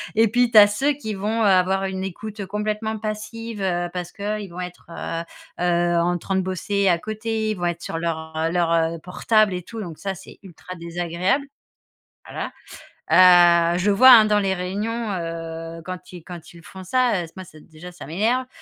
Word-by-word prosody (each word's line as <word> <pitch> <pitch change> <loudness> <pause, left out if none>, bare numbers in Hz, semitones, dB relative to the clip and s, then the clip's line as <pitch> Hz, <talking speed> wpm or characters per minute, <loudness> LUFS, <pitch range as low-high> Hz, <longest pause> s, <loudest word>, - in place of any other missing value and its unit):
et 225 +1 +5
puis, 245 +2 +2
tu 220 - +4
as 205 -1 +10
ceux 265 +8 0
qui 240 -7 -6
vont 210 +3 -2
avoir 190 -1 +3
une 190 0 -4
écoute 205 +2 -6
complètement 210 +2 -2
passive, 215 +1 -6
heu, 175 -2 0
parce 175 -1 -5
qu'ils 205 0 -4
vont 175 - -9
être, 180 -1 -9
heu 165 0 -5 0.4
heu, 175 -1 +2
en 175 +1 +1
train 190 +3 -3
de 190 - +2
bosser 195 +2 -1
à 175 - +3
côté, 220 +1 -3
ils - - -2
vont 175 -2 -3
être 170 - -3
sur 165 - -4
leur 160 -1 -4 0.2
leur, 170 -1 +1
heu, 165 0 +1
portable 205 +4 +1
et 180 - -3
tout 225 +6 -9
donc 170 -5 -8
ça, 195 -1 -3
c'est - - -14
ultra 185 0 -10
désagréable, 175 - -2 0.8
voilà, - - -5 0.6
heu, 175 -1 +6
je 200 +3 +2
vois, 255 +6 +7
hein, 225 -3 +9
dans 210 0 +3
les 195 -1 0
réunions, 210 +5 -3
heu, 165 -1 -6
quand 185 0 -8
ils 175 - -10
quand 175 -3 -10
ils 170 - -14
font 190 +2 -11
ça, 245 -3 +1
heu, - - -7
moi, 190 - -7 0.2
déjà, 170 +2 -12
ça 175 - -11
m'énerve 225 - 0
190 Hz, 195 wpm, -22 LUFS, 175-215 Hz, 0.8 s, as